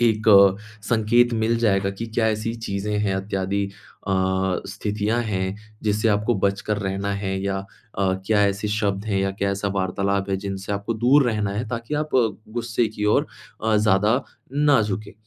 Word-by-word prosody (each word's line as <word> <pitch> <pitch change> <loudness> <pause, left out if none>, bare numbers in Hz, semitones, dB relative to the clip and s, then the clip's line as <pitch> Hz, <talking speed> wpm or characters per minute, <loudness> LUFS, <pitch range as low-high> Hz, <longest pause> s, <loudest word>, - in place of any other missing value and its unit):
एक 110 -2 +2
अ, 100 -2 +7 0.3
संकेत 120 +1 +3
मिल 115 +1 +1
जाएगा 95 -4 +2
कि 105 +4 -6
क्या 110 0 0
ऐसी 110 +1 -1
चीज़ें 105 -2 -3
हैं 100 -2 0
इत्यादि 95 0 -1
अ, 100 0 -11 0.6
स्थितियाँ 105 +3 -1
हैं 95 -2 -2 0.3
जिससे 110 +1 +1
आपको 105 +3 +2
बचकर 100 +2 0
रहना 100 0 -2
है 95 -1 -2
या 100 0 -1
अ, 95 -1 -4
क्या 105 -1 +3
ऐसे 100 +1 -2
शब्द 105 -2 -1
हैं 100 -3 0
या 95 - 0
क्या 100 0 -1
ऐसा 100 +1 -1
वार्तालाप 100 +1 -1
है, 95 - +1
जिनसे 95 0 -5
आपको 100 +3 -2
दूर 130 +5 +4
रहना 105 -2 -1
है 110 +4 -2
ताकि 115 +5 -4
आप 150 +1 -2
गुस्से 115 0 0
की 105 -1 -5
ओर 105 - +3 0.4
अ, 110 -1 +3
ज़्यादा 105 +4 +3 0.3
ना 145 -3 +4
झुकें। 105 -1 -4
105 Hz, 175 wpm, -23 LUFS, 100-110 Hz, 0.6 s, अ